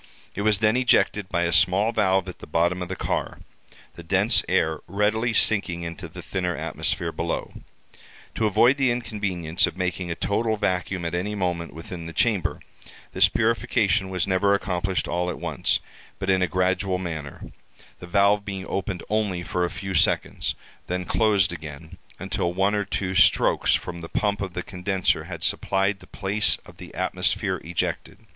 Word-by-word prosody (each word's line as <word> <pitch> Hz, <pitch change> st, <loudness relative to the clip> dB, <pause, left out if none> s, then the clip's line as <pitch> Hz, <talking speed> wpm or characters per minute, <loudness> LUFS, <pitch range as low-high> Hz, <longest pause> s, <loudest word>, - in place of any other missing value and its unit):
It 100 Hz, -, -4 dB
was 105 Hz, 0 st, +2 dB
then 110 Hz, +1 st, +4 dB
ejected 105 Hz, -5 st, +2 dB
by 85 Hz, -2 st, +1 dB
a 85 Hz, -1 st, 0 dB
small 100 Hz, +5 st, +4 dB
valve 95 Hz, -4 st, +2 dB
at -, -, -8 dB
the -, -, -10 dB
bottom 85 Hz, +3 st, +1 dB
of 90 Hz, -, -4 dB
the 90 Hz, -, -3 dB
car—the -, -, -6 dB
dense -, -, +3 dB
air 80 Hz, -1 st, +2 dB
readily 105 Hz, +4 st, +1 dB
sinking 100 Hz, -6 st, +2 dB
into 85 Hz, +2 st, -6 dB
the 85 Hz, +2 st, -10 dB
thinner 90 Hz, -2 st, -2 dB
atmosphere 80 Hz, +3 st, -2 dB
below. -, -, -3 dB, 0.8 s
To 110 Hz, -, +1 dB
avoid 120 Hz, +6 st, +4 dB
the 135 Hz, -2 st, +3 dB
inconvenience 100 Hz, -8 st, 0 dB
of -, -, -7 dB
making 90 Hz, -1 st, -2 dB
a 85 Hz, -, -2 dB
total 110 Hz, +4 st, 0 dB
vacuum 95 Hz, -2 st, -1 dB
at 85 Hz, -, -2 dB
any 95 Hz, +4 st, -2 dB
moment 85 Hz, -5 st, -2 dB
within 85 Hz, +1 st, -7 dB
the 85 Hz, -, -7 dB
chamber, 105 Hz, -4 st, 0 dB, 0.5 s
this -, -, +5 dB
purification 110 Hz, -3 st, +1 dB
was 90 Hz, -3 st, 0 dB
never 100 Hz, +1 st, +3 dB
accomplished 95 Hz, -1 st, -1 dB
all 90 Hz, +1 st, -1 dB
at -, -, -4 dB
once, -, -, 0 dB, 0.4 s
but 95 Hz, 0 st, 0 dB
in 95 Hz, 0 st, +3 dB
a 90 Hz, -, +3 dB
gradual 95 Hz, +1 st, +1 dB
manner—the 80 Hz, 0 st, -9 dB
valve 100 Hz, +2 st, +3 dB
being 95 Hz, -2 st, -5 dB
opened 95 Hz, -2 st, -3 dB
only 105 Hz, -4 st, 0 dB
for 90 Hz, 0 st, -1 dB
a -, -, -2 dB
few 95 Hz, +1 st, -5 dB
seconds, 85 Hz, -, +1 dB, 0.3 s
then 90 Hz, 0 st, -2 dB
closed 100 Hz, -5 st, +2 dB
again, 80 Hz, +2 st, -9 dB, 0.2 s
until 85 Hz, -, -2 dB
one 95 Hz, +3 st, +1 dB
or 105 Hz, -1 st, 0 dB
two 95 Hz, -1 st, -2 dB
strokes 95 Hz, -1 st, +4 dB
from 85 Hz, -, -5 dB
the 80 Hz, -, -8 dB
pump 100 Hz, -1 st, 0 dB
of 95 Hz, -3 st, -4 dB
the 90 Hz, -, -2 dB
condenser 95 Hz, 0 st, 0 dB
had -, -, -7 dB
supplied 95 Hz, +1 st, +1 dB
the 90 Hz, -, -16 dB
place 100 Hz, +2 st, +1 dB
of -, -, -15 dB
the -, -, -10 dB
atmosphere -, -, 0 dB
ejected. 85 Hz, +1 st, -3 dB
95 Hz, 170 wpm, -24 LUFS, 90-105 Hz, 0.8 s, this